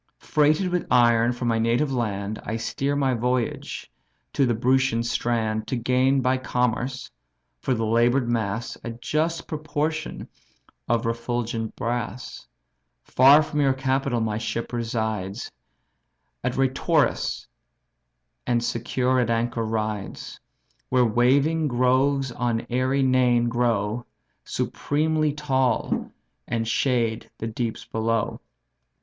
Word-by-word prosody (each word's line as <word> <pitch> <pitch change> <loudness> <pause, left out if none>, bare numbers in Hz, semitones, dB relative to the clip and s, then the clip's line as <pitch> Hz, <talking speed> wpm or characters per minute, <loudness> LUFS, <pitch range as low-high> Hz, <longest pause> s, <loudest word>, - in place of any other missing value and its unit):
Freighted 155 +5 +2
with 180 0 -1
iron 120 -1 +4
from 120 0 -3
my 115 -1 +2
native 120 +5 +1
land, 105 -3 -2
I 110 - -3
steer 140 +5 -2
my 135 -2 +1
voyage 125 0 -2 0.4
to 135 - +2
the 120 - +1
Brutian 130 0 +2
strand 110 -2 -1
To - - -1
gain 130 +3 +2
by 130 +1 +1
commerce, 125 +1 -1 0.5
for 130 - 0
the 115 -1 -1
labour'd 120 +3 +3
mass, 115 -1 -2
A - - -4
just 155 +7 -1
proportion 155 +1 -3 0.6
of 115 -1 +1
refulgent 115 -1 -2
brass. 120 -1 -4 0.6
Far 140 +4 +6
from 150 -1 -2
your 135 -2 +3
capital 135 -2 0
my 110 -1 -1
ship 115 +1 -4
resides 110 -3 -3 0.9
At 125 0 -1
Reitorus, 135 +4 +1 1.0
and 120 -1 +1
secure 125 +2 0
at 120 -2 +1
anchor 115 0 0
rides; 110 -2 -4 0.5
Where 125 -1 +4
waving 140 +8 +3
groves 130 +1 +2
on 120 -1 -1
airy 130 +2 +1
Neign 125 -2 +3
grow, 115 -1 0 0.4
Supremely 155 +1 0
tall 135 -4 0 0.4
and 115 -1 -1
shade 115 -2 0
the - - -5
deeps 115 0 -3
below. 115 +1 -1
120 Hz, 120 wpm, -24 LUFS, 115-135 Hz, 1.0 s, Far